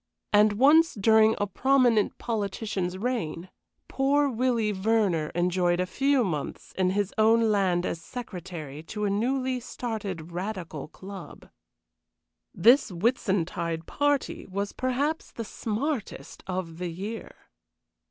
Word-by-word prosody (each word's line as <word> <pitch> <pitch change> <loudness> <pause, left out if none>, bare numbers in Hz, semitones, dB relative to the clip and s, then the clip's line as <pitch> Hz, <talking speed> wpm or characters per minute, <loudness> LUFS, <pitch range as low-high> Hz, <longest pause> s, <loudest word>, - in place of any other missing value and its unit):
And 210 0 +6
once, 295 +9 +5
during 220 +1 +5
a 205 - 0
prominent 245 +1 +2
politician's 200 -4 -3
reign, 190 -6 -3 0.4
poor 285 +2 +2
Willie 235 -3 +1
Verner 195 -6 +1
enjoyed 175 0 +1
a 180 - +1
few 270 +7 +2
months 155 -8 -4
in 185 -1 +2
his 200 +1 -1
own 225 0 +4
land 185 -3 +2
as 165 - -3
secretary 175 - -7
to 210 +6 -4
a 200 - +1
newly 255 +4 0
started 205 -9 -5
Radical 175 -5 -5
club. 190 +4 -11 1.0
This 250 +2 +5
Whitsuntide 175 -5 -1
party 290 -2 -1
was 200 +1 -3
perhaps 280 +5 -1
the 230 - -6
smartest 230 +5 -4
of 180 -3 -4
the 180 -1 -2
year. 205 +7 -6
205 Hz, 120 wpm, -27 LUFS, 180-245 Hz, 1.0 s, And